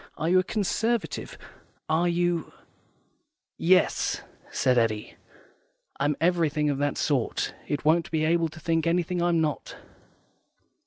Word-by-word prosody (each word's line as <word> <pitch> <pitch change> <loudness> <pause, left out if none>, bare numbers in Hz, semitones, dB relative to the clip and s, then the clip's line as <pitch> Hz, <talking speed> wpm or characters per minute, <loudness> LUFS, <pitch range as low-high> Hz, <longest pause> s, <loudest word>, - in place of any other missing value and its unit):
Are 160 - -2
you 185 +1 +5
a - - +2
Conservative? 220 +3 -2 0.5
Are 160 +3 +2
you 175 -1 0 0.3
' - - -41
" - - -59 0.2
"Yes," 180 - 0 0.3
said 125 - +1
Eddy, 115 -3 0 0.8
"I'm 145 +1 +1
everything 155 -4 +2
of 140 - -3
that 145 0 0
sort. 135 -6 0
It 145 0 -3
won't 165 +2 +3
be 155 -1 0
able 165 0 +2
to 155 - -12
think 165 0 0
of - - +4
anything 175 +1 0
I'm 170 -1 +2
not." 155 -2 -2
165 Hz, 145 wpm, -26 LUFS, 150-175 Hz, 0.8 s, you